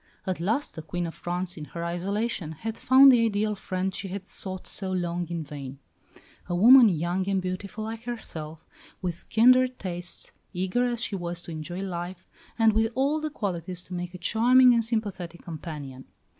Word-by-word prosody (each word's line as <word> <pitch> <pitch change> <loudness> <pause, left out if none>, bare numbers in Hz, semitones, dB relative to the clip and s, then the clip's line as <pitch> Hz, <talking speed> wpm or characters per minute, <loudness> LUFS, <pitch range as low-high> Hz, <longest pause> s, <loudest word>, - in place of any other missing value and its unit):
At 185 -3 -2
last 220 - -1
the 160 - -7
Queen 175 +2 -3
of 165 - -5
France, 180 +1 -3
in 150 - -6
her 170 +4 -6
isolation, 185 0 -2
had 220 +8 -5
found 265 +3 +7
the 240 -2 +4
ideal 215 -1 +1
friend 190 -1 -3
she 195 - -4
had 190 0 -6
sought 185 -1 -2
so 190 -2 -4
long 175 -1 -1
in 170 -2 -3
vain; 140 -2 -8 0.7
a 175 - 0
woman 235 +5 +8
young 175 +3 -1
and 195 -1 +2
beautiful 185 +3 -4
like 225 +1 -6
herself, 160 -10 -6 0.4
with 175 -1 -4
kindred 255 +2 +5
tastes, 175 -2 -5 0.2
eager 190 +7 0
as 240 -1 -2
she 200 - -1
was 175 -1 -3
to 170 - -8
enjoy 160 +3 -5
life, 180 -1 -5 0.3
and 225 -2 +5
with 220 +1 +2
all 280 +4 +1
the 310 - -2
qualities 180 - -4
to 185 - -10
make 180 0 -5
a - - -5
charming 245 +7 +5
and 230 -1 +3
sympathetic 200 -7 -3
companion. 150 -5 -7
185 Hz, 185 wpm, -27 LUFS, 175-225 Hz, 0.7 s, woman